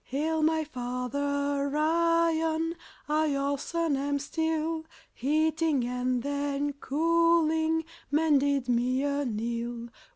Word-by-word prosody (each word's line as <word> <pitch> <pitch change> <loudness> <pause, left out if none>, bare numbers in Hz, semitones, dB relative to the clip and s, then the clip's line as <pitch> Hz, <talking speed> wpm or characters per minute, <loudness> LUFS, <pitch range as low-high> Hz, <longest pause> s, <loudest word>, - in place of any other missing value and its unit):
Hail, 315 +4 -1
my 315 0 +2
Father 280 +2 -2
Iron! 330 0 +2 0.3
I, 305 +1 +2
your 280 -1 0
son, 335 -1 -1
am 285 +1 -1
Steel. 320 +2 -1 0.3
Heating 310 0 +1
and 250 0 -1
then 285 0 -1
cooling 320 +2 +2 0.2
Men 300 0 +3
did 280 -2 0
me 250 +2 +1
anneal. 235 -3 -2
285 Hz, 100 wpm, -28 LUFS, 270-320 Hz, 0.3 s, Men